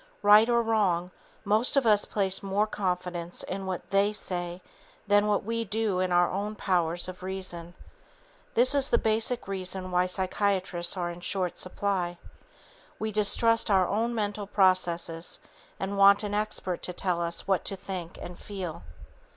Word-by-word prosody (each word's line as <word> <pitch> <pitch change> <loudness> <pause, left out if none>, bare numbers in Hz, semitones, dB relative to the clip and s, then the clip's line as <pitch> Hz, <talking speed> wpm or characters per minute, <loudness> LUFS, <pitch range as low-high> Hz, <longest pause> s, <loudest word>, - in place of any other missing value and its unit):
Right 210 +3 +7
or 235 0 +3
wrong, 190 -6 +1 0.3
most 215 +7 +2
of 270 - +3
us 210 -2 +4
place 195 -2 0
more 200 +1 +1
confidence 180 -4 -3
in 190 0 -5
what 185 -2 -4
"they" 200 +1 +3
say 175 -3 -4 0.4
than 205 0 +3 0.2
we 230 +1 -1
do 215 -3 -1
in 185 -1 0
our 175 0 +4
own 205 +3 -3
powers 175 -4 0
of 185 0 -8
reason. 185 -2 -6 0.8
This 250 +4 +4
is 280 -1 +2
the 235 - +4
basic 225 +2 0
reason 185 -1 -4
why 180 0 +2
psychiatrists 185 -1 0
are 175 -1 -2
in 170 - -9
short 180 -1 -2
supply. 185 -2 -2 0.8
We 220 0 -3
distrust 225 +2 +3
our 190 -3 +4
own 230 +3 -1
mental 205 -2 -2
processes 175 -4 +1 0.4
and 200 +1 -3
want 200 +1 +7
an 205 -1 -3
expert 205 -4 -2
to 180 - -2
tell 175 -1 -1
us 170 0 -3
what 190 -2 +1
to 195 - 0
think 185 -3 -7
and 175 - -9
feel. 185 - -6
195 Hz, 160 wpm, -28 LUFS, 180-210 Hz, 0.8 s, Right